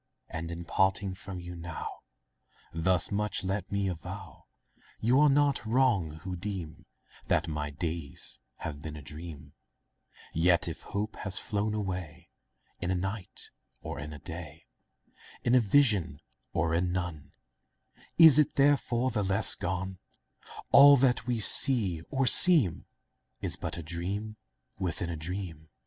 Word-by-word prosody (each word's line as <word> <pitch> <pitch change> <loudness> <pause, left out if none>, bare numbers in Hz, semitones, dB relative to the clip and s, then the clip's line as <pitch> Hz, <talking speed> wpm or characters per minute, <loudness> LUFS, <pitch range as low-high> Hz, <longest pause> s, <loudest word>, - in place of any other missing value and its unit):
And, 80 +1 -5
in 85 0 -6
parting 95 +1 +1
from 95 0 -7
you 90 0 -8
now, 85 -1 -7 0.9
Thus 90 +2 +2
much 105 0 -2
let 95 +1 -3
me 100 -1 0
avow— 85 -4 -8 0.5
You 120 +5 +3
are 150 0 +6
not 140 -2 +2
wrong, 110 -8 +1
who 95 -1 -4
deem 90 -4 -7 0.4
That 85 - +1
my 75 -2 -3
days 80 -1 -5 0.2
have 75 0 -6
been 75 0 -7
a 75 - -10
dream; 75 +1 -10 0.8
Yet 85 +2 +2
if 85 - -6
hope 105 +2 -4
has 95 -2 -3
flown 105 -1 -2
away 90 -5 -5 0.5
In 85 - -3
a 95 - +1
night, 95 +1 -4 0.3
or - - -6
in 75 +1 -7
a 75 - -8
day, 80 +1 -9 0.8
In 120 - +1
a 130 - +7
vision, 105 - +2 0.3
or 80 +1 0
in 90 +2 0
none, 85 -6 -5 0.8
Is 160 -4 +8
it 150 - +2
therefore 130 -3 +2
the 110 - -1
less 100 +2 +4
gone? 95 0 -3 0.7
All 140 0 +9
that 125 -1 +1
we 120 -2 0
see 105 - +4
or 135 -1 0
seem 145 - +5 0.5
Is - - -1
but - - -6
a 85 - -6
dream 95 +7 -5 0.4
within 85 -2 -2
a - - -4
dream. 80 -1 -6
95 Hz, 145 wpm, -29 LUFS, 85-110 Hz, 0.9 s, All